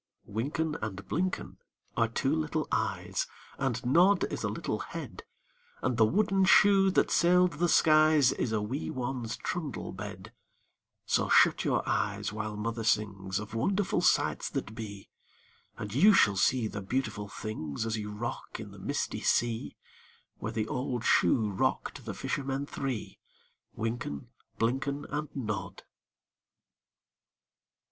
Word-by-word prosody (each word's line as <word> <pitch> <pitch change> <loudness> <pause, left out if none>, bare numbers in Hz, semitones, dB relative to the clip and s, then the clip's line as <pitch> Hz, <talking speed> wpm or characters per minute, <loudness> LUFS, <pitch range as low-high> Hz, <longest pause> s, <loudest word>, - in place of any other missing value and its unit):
Wynken 145 +9 -2
and 100 -3 -5
Blynken 185 +3 -2 0.4
are - - +3
two - - 0
little 80 -1 -1
eyes, - - -1 0.3
And 125 -3 -1
Nod 175 +9 +5
is - - -3
a - - 0
little - - -3
head, - - -7 0.6
And 125 - 0
the 110 -2 +5
wooden 195 - +2
shoe 195 0 +6
that 190 - +2
sailed 180 +1 +4
the 175 0 +2
skies 155 -4 +5
Is 115 - -2
a 105 -2 0
wee 130 +8 -3
one's 125 -3 -3
trundle 155 -8 -4
bed; 95 0 -8 0.7
So - - +1
shut - - +5
your - - +1
eyes - - -1
while 105 0 -4
Mother 115 +2 -3
sings 100 -3 0
Of 105 +1 -6
wonderful 190 - +1
sights - - +2
that 110 - -4
be, 105 -4 -8 0.7
And 105 0 -6
you 200 - +6
shall 100 - +5
see 120 +5 +2
the 105 - -5
beautiful 105 -1 -2
things 105 -4 -5
As 115 0 -1
you 105 -1 -4
rock 110 +3 -5
on - - -8
the - - -12
misty - - -2
sea 115 -1 0 0.6
Where 110 - -3
the 110 -1 -2
old 125 -1 -2
shoe 105 +4 +3
rocked 95 - -1
the - - -5
fishermen 135 0 -2
three, 135 -5 -4 0.6
Wynken, 110 - -3 0.3
Blynken, 135 +5 -1
And 150 +1 -2
Nod. 105 -7 -4
120 Hz, 140 wpm, -30 LUFS, 105-145 Hz, 0.7 s, shoe